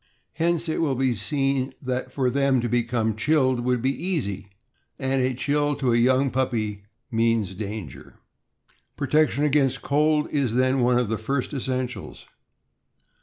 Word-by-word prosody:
Hence 170 +1 0
it 160 - -1
will 145 -5 +1
be 130 -1 +1
seen 135 +4 -1
that 130 -1 -3
for 130 -2 0
them 140 -1 +2
to 120 - -1
become 115 -2 0
chilled 130 0 +2
would 125 0 0
be 135 - +2
easy; 120 - -2 0.5
and 135 0 0
a 130 0 0
chill 145 +2 0
to 130 -3 0
a - - +4
young 130 +2 +3
puppy 110 -6 -2 0.3
means 115 -4 +1
danger. 95 - -7 0.8
Protection 150 0 +2
against 135 -3 +2
cold 150 +1 +2
is, 130 -6 0
then, 130 +1 +2
one 125 0 +3
of 125 -2 +1
the 110 0 -2
first 135 +6 -2
essen 130 -1 -1
ti^ls. 125 - -9
130 Hz, 155 wpm, -24 LUFS, 115-140 Hz, 0.8 s, a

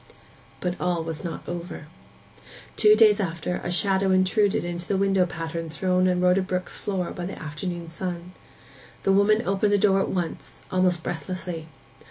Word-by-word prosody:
But 180 0 -3
all 175 -2 0
was 160 -1 -5
not 170 -3 -6
over. 175 -3 -6 0.9
Two 215 -1 +6
days 215 -2 +6
after, 175 -2 -2
a 175 - -2
shadow 190 +2 +2
intruded 190 +2 +3
into 175 0 -4
the 195 - +1
window 195 -2 +2
pattern 165 -1 -5
thrown 185 +3 +1
on 180 -1 +1
Rhoda 180 +1 +4
Brook's 185 -1 -3
floor 190 -3 -3
by 175 -1 -5
the 195 - -7
afternoon 170 +3 -5
sun. 175 +1 -5 0.7
The 195 - +3
woman 210 +3 +4
opened 200 +2 +2
the - - +5
door 195 -1 +4
at - - 0
once, 175 -3 -4
almost 185 -2 +2
breathlessly. 175 -2 -5
180 Hz, 165 wpm, -25 LUFS, 170-195 Hz, 0.9 s, Two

